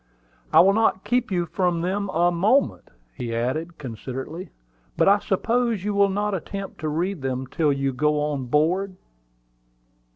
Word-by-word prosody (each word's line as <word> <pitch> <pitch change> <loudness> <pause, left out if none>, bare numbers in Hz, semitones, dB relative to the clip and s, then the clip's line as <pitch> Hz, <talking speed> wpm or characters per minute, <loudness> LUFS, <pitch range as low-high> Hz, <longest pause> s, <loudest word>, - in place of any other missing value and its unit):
"I - - +8
will 195 +3 +5
not 220 -3 +2
keep 250 0 0
you 175 -3 0
from 175 -1 0
them 195 +3 -1
a 175 0 +2
moment," 210 +11 +1 0.2
he 115 - -4
added, 155 +9 -2
considerately. 135 - -6 0.5
"But - - +3
I 200 +1 +6
suppose 230 +1 0
you 210 0 -1
will 200 0 +4
not 205 +1 -1
attempt 195 +2 -5
to 155 - -2
read 175 +2 -2
them 130 0 -2
till 150 +3 +1
you 135 -1 -1
go 150 +3 +1
on 145 -3 -2
board?" 180 +8 +1
175 Hz, 160 wpm, -24 LUFS, 150-200 Hz, 0.5 s, I